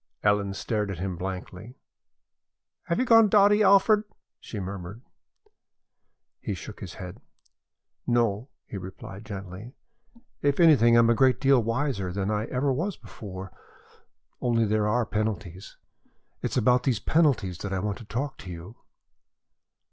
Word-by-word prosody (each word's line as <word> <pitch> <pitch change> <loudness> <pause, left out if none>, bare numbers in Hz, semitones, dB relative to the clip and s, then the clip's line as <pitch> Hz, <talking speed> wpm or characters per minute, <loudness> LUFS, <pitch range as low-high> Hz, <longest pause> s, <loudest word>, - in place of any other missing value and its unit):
Ellen 100 -1 +1
stared 105 0 -2
at 95 - -4
him 95 +1 -3
blankly. 95 +5 -7 1.1
"Have 170 - -1
you 255 - +1
gone 225 -3 +6
dotty, 205 +1 +5
Alfred?" 205 +1 +5 0.4
she 110 - -7
murmured. 100 +4 -7 1.4
He 100 - -4
shook 105 +4 -9
his 90 -5 -8
head. 90 -1 -9 0.9
"No," 120 0 +1 0.2
he 100 - -7
replied 95 +2 -9
gently. 100 +3 -8 0.7
"If 145 +2 +1
anything, 140 -9 +6
I - - +7
am 115 0 +4
a - - +5
great 130 +2 +3
deal 135 -2 +4
wiser 115 -4 -1
than 100 +2 -2
ever 125 +6 -1
I - - +1
was 175 +8 -2
before. 95 -2 -9 0.9
Only 115 -2 +2
there 105 0 +1
are 115 +2 +1
penalties. 105 -4 -4 0.6
It - - -1
is - - -3
about 125 +1 +4
these 125 -5 0
penalties 130 - +1
that 100 - -5
I 95 - -1
want 100 0 -3
to 115 - -11
talk 130 +7 -4
to 95 - -9
you." 90 +6 -9
110 Hz, 150 wpm, -26 LUFS, 95-130 Hz, 1.4 s, I